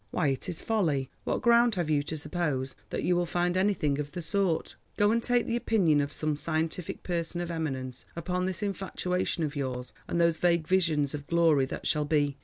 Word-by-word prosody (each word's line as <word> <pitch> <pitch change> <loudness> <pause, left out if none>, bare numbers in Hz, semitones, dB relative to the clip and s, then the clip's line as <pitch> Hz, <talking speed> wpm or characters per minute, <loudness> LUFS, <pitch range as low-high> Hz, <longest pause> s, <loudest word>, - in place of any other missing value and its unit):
Why 155 -5 +1
it 135 - -2
is 170 - -5
folly. 155 -12 0
What - - -1
ground 235 -1 +5
have 170 -4 -1
you 145 -1 +3
to 155 +2 -5
suppose 145 -5 -2 0.2
that - - -3
you 180 - +2
will 175 0 +1
find 175 +1 0
anything 185 -7 +1
of 145 0 -4
the 175 - -4
sort? 175 0 0 0.2
Go 205 0 +4
and 230 +1 +2
take 245 0 +2
the 235 - -1
opinion 185 -11 +3
of 145 - -2
some 155 -1 -1
scientific 160 +3 -2
person 170 -1 -2
of 175 0 -3
eminence 135 -6 -4
upon 180 +2 -1
this 190 +2 -3
infatuation 185 -3 -1
of 150 0 -2
yours 130 -3 -4
and 170 - -1
those 170 -1 +3
vague 170 -3 +2
visions 160 -7 +2
of 145 -1 -6
glory 165 -5 +4
that - - -6
shall 150 -1 +2
be. 145 -2 +1
165 Hz, 210 wpm, -29 LUFS, 145-180 Hz, 0.2 s, ground